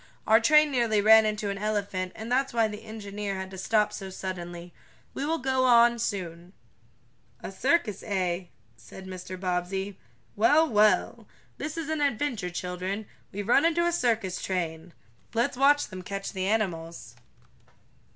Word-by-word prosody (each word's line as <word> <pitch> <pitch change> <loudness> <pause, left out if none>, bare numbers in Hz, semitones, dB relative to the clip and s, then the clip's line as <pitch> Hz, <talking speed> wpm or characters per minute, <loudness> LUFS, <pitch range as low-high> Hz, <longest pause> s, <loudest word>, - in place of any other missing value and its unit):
Our 220 +1 +6
train 300 +5 +5
nearly 235 -5 +2
ran 220 +1 +7
into 210 -1 -2
an 200 - -5
elephant, 200 -3 -2
and 220 +2 -7
that's 265 +1 +1
why 230 -2 +3
the 215 +1 -8
engineer 205 -2 -5
had 190 0 -6
to 190 - -9
stop 210 +2 +1
so 195 -1 -6
suddenly. 175 -2 -7 0.4
We 280 - -3
will 325 +1 0
go 260 -1 0
on 235 -1 +6
I - - -8
soon." 180 -5 -4 0.9
"A - - -5
circus, 220 - 0
eh?" 185 -3 -1 0.3
said 115 - -12
Mr. 185 0 -8
Bobbsey. 190 +2 -3 0.4
"Well, 290 +10 +4
well! 215 0 +2 0.3
This 305 +2 -5
is 325 -3 -3
an 315 -1 -2
adventure, 250 -8 -1
children. 180 +4 -4 0.3
We've 205 +1 -5
run 275 +4 +5
into 335 +1 +2
a 345 - +2
circus 225 - 0
train! 170 -2 -3 0.4
Let's 235 +2 +1
watch 285 +3 +4
them 185 -2 -7
catch 195 +2 -5
the 185 0 -2
animals." 170 -6 -2
210 Hz, 160 wpm, -27 LUFS, 185-235 Hz, 0.9 s, ran